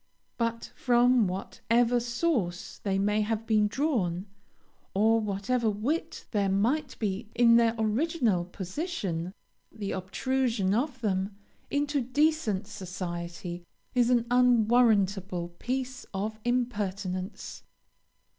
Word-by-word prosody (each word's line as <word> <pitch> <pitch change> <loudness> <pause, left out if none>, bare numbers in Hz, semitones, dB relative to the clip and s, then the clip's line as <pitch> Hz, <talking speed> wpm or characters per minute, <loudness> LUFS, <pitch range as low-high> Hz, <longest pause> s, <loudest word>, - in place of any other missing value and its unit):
But 230 0 -2
from 245 -2 +4
whatever 230 +6 +1
source 235 - -1
they 195 -2 -1
may 210 +2 +2
have 220 +1 -1
been 215 -2 +3
drawn, 205 - 0 0.7
or 220 +3 +4
whatever 215 +3 0
wit 230 +11 -2
there 200 -3 +1
might 230 +11 0
be 210 +1 -3
in 235 -1 +6
their 230 -1 +3
original 220 - +1
position, 185 - -4 0.4
the 205 -3 -5
obtrusion 210 +2 0
of 260 +2 -1
them 195 -2 -1 0.3
into 290 0 0
decent 260 -6 +1
society 175 -2 -6 0.3
is 245 -1 +3
an 240 -2 +3
unwarrantable 215 -7 +3
piece 260 +1 -3
of 215 +3 -3
impertinence. 205 -6 -2
220 Hz, 105 wpm, -28 LUFS, 195-245 Hz, 0.7 s, in